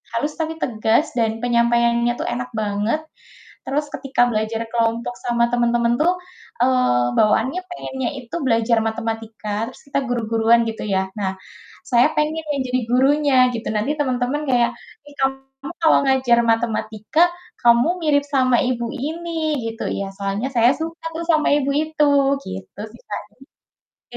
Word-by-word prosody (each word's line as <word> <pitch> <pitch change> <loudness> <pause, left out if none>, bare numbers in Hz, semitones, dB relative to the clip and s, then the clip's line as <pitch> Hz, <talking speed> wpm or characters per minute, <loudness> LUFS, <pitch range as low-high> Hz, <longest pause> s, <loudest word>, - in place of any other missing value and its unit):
halus 295 +6 -1
tapi 320 0 -1
tegas, 225 +4 +1
dan 225 -2 +2
penyampaiannya 235 0 +2
tuh - - -2
enak 245 +1 -4
banget. 210 +7 -1 0.6
Terus 295 +2 -1
ketika 265 -2 -1
belajar 220 +1 -1
kelompok 230 +1 0
sama 235 -1 +1
temen-temen 240 0 +2
tuh, 350 +3 +4 0.5
eee, 250 - +3
bawaannya 230 +10 +2
pengennya 265 -8 -4
itu 245 +2 -9
belajar 230 -1 +2
matematika, 225 -1 -4
terus 255 - -16
kita 280 - 0
guru-guruan 230 -1 +2
gitu 220 - -6
ya. 190 -1 0
Nah, 190 -2 -1 0.6
saya 240 +3 +5
pengen 305 +1 +1
yang 280 -2 -1
jadi 250 0 0
gurunya 280 +3 +3 0.2
gitu, 230 -1 -5
nanti 215 +8 0
temen-temen 260 +1 0
kayak, 240 -2 +3 0.4
"Ih, 290 - -14
kamu 270 0 +1 0.4
kalau 320 - +5
ngajar 260 -3 +3
matematika, 225 +4 -1 0.4
kamu 235 +3 +5
mirip 290 -3 +2
sama 260 -3 +2
ibu 245 -2 -1
ini," 315 +2 -2
gitu. 225 +1 -5 0.2
"Ya, 200 - -3
soalnya 200 +4 -2
saya 235 +1 +5
suka 330 +1 -6
tuh 335 - -3
sama 310 -3 +3
ibu 280 -1 0
itu," 310 0 +1 0.4
gitu 95 - -8
sih, 235 - -16
Kak, 205 - -3 0.9
jadi - - -11
240 Hz, 145 wpm, -21 LUFS, 225-280 Hz, 0.9 s, saya